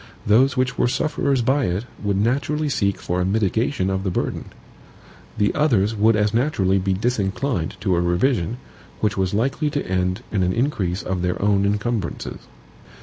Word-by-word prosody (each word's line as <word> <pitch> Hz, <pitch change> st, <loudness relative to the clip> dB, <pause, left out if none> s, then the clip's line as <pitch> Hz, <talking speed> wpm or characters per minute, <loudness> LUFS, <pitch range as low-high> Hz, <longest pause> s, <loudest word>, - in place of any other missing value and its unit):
Those 125 Hz, +5 st, +4 dB
which 125 Hz, 0 st, 0 dB
were -, -, +3 dB
sufferers 135 Hz, -1 st, 0 dB
by 135 Hz, +2 st, +2 dB
it 90 Hz, +6 st, -2 dB, 0.2 s
would 100 Hz, -2 st, 0 dB
naturally 140 Hz, +7 st, 0 dB
seek 100 Hz, -7 st, 0 dB
for 90 Hz, +1 st, -2 dB
a -, -, +2 dB
mitigation 105 Hz, +2 st, 0 dB
of 95 Hz, 0 st, -1 dB
the 95 Hz, -, 0 dB
burden. -, -, -2 dB, 0.9 s
The 105 Hz, -, +2 dB
others 115 Hz, -9 st, +2 dB
would 110 Hz, +2 st, +4 dB
as 105 Hz, 0 st, +1 dB
naturally 105 Hz, -7 st, +2 dB
be 95 Hz, +1 st, 0 dB
disinclined 100 Hz, -, -1 dB
to 95 Hz, -3 st, +1 dB
a 85 Hz, -, +1 dB
revision, 90 Hz, +4 st, +1 dB, 0.4 s
which 105 Hz, -2 st, 0 dB
was 95 Hz, 0 st, 0 dB
likely 135 Hz, +7 st, 0 dB
to 145 Hz, -1 st, -2 dB
end 90 Hz, +3 st, -1 dB
in 100 Hz, -, 0 dB
an 90 Hz, 0 st, +1 dB
increase 105 Hz, -8 st, -1 dB
of 90 Hz, -1 st, -2 dB
their 90 Hz, 0 st, -1 dB
own 100 Hz, -1 st, +2 dB
incumbrances. 105 Hz, +2 st, -2 dB
105 Hz, 170 wpm, -22 LUFS, 95-125 Hz, 0.9 s, Those